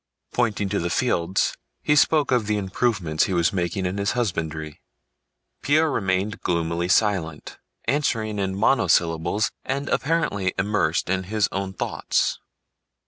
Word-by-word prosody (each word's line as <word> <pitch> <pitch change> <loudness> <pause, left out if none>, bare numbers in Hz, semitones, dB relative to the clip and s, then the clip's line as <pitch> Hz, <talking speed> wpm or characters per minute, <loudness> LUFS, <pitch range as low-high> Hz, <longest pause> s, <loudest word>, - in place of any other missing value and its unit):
Pointing 110 -4 0
to 100 - 0
the 85 - -2
fields, 95 -3 +1 0.3
he 150 - +3
spoke 150 0 +3
of 120 -5 +2
the 105 -1 +1
improvements 95 -5 0
he 95 - -2
was 85 +1 +2
making 90 +1 -1
in 90 +3 -2
his 100 0 0
husbandry. 80 -10 -3 0.8
Pierre 155 +2 +3
remained 95 -1 -1
gloomily 85 0 -1
silent, 90 -6 0 0.3
answering 115 -6 0
in 95 -1 -1
monosyllables 90 -5 +2
and 140 +2 -3
apparently 130 - 0
immersed 95 -4 +1
in 95 0 -1
his 105 +1 +1
own 95 0 -3
thoughts. - - -1
100 Hz, 135 wpm, -24 LUFS, 85-115 Hz, 0.8 s, he